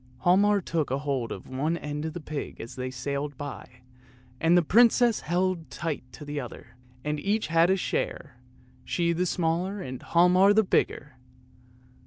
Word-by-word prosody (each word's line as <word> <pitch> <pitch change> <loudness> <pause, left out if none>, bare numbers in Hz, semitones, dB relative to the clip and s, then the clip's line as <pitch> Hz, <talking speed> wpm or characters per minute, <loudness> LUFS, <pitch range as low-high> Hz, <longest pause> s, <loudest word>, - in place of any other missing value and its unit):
Hialmar 200 +3 +4
took 165 -3 -1
hold 135 -3 -2
of - - -7
one 150 +6 -1
end 150 -1 -5
of 160 - -4
the 175 - -5
pig 150 -2 -6
as 115 - -8
they 130 0 -4
sailed 140 +2 -4
by, 125 -3 -8 0.6
and 165 +2 +4
the 175 - +4
prin 235 +9 +6
cess 240 -1 +2
held 175 0 -1
the 145 -2 -5
other 125 -3 -7
tight, - - -23 0.4
and 150 0 -2
each 210 +6 0
had 165 +2 +3
a 190 - +3
share, 140 -7 -3 0.5
she 170 -1 0
the 180 +2 0
smaller 175 +4 -1
and 130 -7 -6
Hialmar 180 +4 +4
the 220 - +5
bigger! 145 -7 -1
165 Hz, 165 wpm, -27 LUFS, 140-180 Hz, 0.6 s, prin